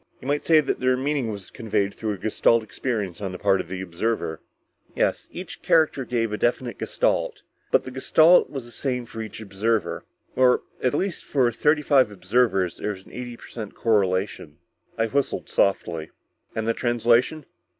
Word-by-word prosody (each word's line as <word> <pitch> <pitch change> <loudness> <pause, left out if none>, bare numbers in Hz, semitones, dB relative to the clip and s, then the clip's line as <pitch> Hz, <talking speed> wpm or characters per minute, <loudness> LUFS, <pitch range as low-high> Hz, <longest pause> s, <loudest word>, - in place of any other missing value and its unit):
You - - -9
might 145 +1 0
say 160 -2 +5
that 140 - -2
their 130 0 +2
meaning 135 -2 -1
was 100 -3 -7
conveyed 100 -3 -1
through 110 -2 -3
a - - -6
Gestalt 110 +3 +2
experience 105 -2 -3
on 95 -2 -3
the - - -5
part 95 0 +2
of - - -11
the 95 +1 -5
observer." 85 -2 -2 0.5
"Yes, - - 0
each - - -8
character 155 -5 +3
gave 115 -3 -1
a 105 - -3
definite 120 -1 0
Gestalt. - - 0 0.3
But, - - +3
the 130 - -7
Gestalt 155 +6 +5
was 135 -4 -6
the 120 - -12
same 125 -1 -2
for 115 -1 -7
each 110 0 -7
observer. 110 +2 -1 0.3
Or 125 -1 +4 0.2
at 130 +2 +1
least 190 +1 -2
for 130 -4 +2
thirty 150 +5 +2
five 135 -5 +4
observers 95 -2 +1
there - - -3
was 95 -1 -13
an - - -16
eighty 120 -1 -7
per - - -13
cent 110 -4 -7
correlation." 95 -7 0 0.4
I 115 - +2
whistled 140 +4 -1
softly. 85 -5 +1 0.5
"And 110 0 -2
the 115 - +3
translation?" 120 +5 +2
115 Hz, 180 wpm, -24 LUFS, 100-130 Hz, 0.5 s, say